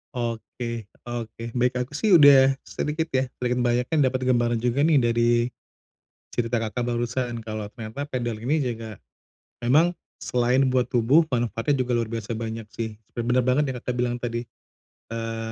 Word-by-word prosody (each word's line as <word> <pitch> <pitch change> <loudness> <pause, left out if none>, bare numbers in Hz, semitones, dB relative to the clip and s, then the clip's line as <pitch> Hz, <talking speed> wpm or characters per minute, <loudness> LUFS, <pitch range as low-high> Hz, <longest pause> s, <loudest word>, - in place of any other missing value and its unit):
Oke. 115 -1 -4 0.2
Oke. 115 -1 -6
Baik. 125 +1 +1
Aku 125 - -14
sih 195 +5 +4
udah 135 -3 +7
sedikit 155 +2 -2
ya, 130 0 +1
sedikit 125 0 0
banyaknya 120 +5 +1
dapet 130 0 -1
gambaran 120 -2 +2
juga 125 +2 +1
nih 160 -2 +4
dari 120 0 +2 1.0
cerita 120 0 0
Kakak, 115 +2 -2
barusan, 120 0 -2
kalau 110 -1 -4
ternyata 115 +5 -5
padel 120 -5 -3
ini 145 +7 +1
juga, 115 -4 -4 0.6
memang 155 +9 +4 0.2
selain 125 +2 +2
buat 125 -1 +2
tubuh, 125 +7 +4
manfaatnya 120 +3 0
juga 125 -1 +1
luar 115 -2 -1
biasa 115 0 -3
banyak 115 -1 -5
sih. 110 -1 -4 0.2
Bener 120 +2 +2
banget 135 +2 +2
yang 125 - -5
Kakak, 125 +1 -3
bilang 120 0 0
tadi, 120 -1 -3 0.7
eee, 115 0 -4
120 Hz, 155 wpm, -25 LUFS, 115-130 Hz, 1.0 s, udah